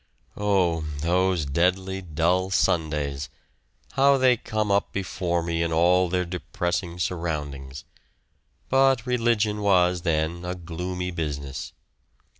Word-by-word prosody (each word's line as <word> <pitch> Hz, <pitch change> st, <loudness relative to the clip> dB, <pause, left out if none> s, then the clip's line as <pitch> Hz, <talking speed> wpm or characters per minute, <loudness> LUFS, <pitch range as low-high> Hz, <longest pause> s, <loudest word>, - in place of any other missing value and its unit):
Oh! 95 Hz, -5 st, +1 dB, 0.2 s
those 90 Hz, 0 st, +1 dB
deadly 95 Hz, +6 st, 0 dB
dull 90 Hz, +2 st, 0 dB
Sundays; 75 Hz, -6 st, 0 dB, 0.6 s
how 140 Hz, 0 st, +4 dB
they 130 Hz, -1 st, +5 dB
come 110 Hz, -2 st, -2 dB
up 100 Hz, 0 st, +1 dB
before 90 Hz, -3 st, -2 dB
me 85 Hz, 0 st, -1 dB
in 85 Hz, 0 st, 0 dB
all 90 Hz, +2 st, +3 dB
their 90 Hz, 0 st, 0 dB
depressing 90 Hz, 0 st, -3 dB
surroundings; 75 Hz, -6 st, -4 dB, 0.8 s
but 135 Hz, -2 st, +3 dB
religion 115 Hz, -4 st, +1 dB
was 90 Hz, -3 st, +3 dB
then 85 Hz, 0 st, -1 dB
a 90 Hz, +1 st, -3 dB
gloomy 90 Hz, +1 st, -4 dB
business. 70 Hz, -5 st, -5 dB
90 Hz, 110 wpm, -25 LUFS, 80-95 Hz, 0.8 s, they